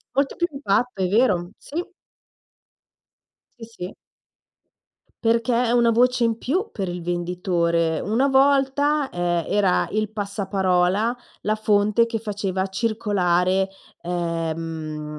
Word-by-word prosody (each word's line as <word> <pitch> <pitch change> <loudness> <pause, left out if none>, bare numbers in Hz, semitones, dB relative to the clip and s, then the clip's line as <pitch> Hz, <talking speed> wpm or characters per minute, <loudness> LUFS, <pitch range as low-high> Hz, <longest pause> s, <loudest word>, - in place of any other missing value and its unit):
Molto 275 0 +1
più 345 - 0
impatto, 245 -5 -1
è - - +2
vero, 195 -4 +2
sì. 330 +5 -5 1.8
Sì, 225 - -8
sì. 180 +2 -6 1.3
Perché, 230 +2 +2
è 235 - +1
una 240 -1 +4
voce 245 +1 +3
in 230 -1 0
più 370 - -1
per 195 -3 -4
il 175 0 -4
venditore. 170 -2 0
Una 235 +7 +1
volta, 280 +1 +3
ehm, 175 -1 -1
era 195 -3 +2
il 215 0 -1
passaparola, 200 +1 0 0.3
la 215 +1 0
fonte 215 +1 +3
che 230 -1 -3
faceva 195 -3 -2
circolare, 190 -3 +1 0.3
ehm, 165 -3 -3
205 Hz, 115 wpm, -23 LUFS, 180-235 Hz, 1.8 s, una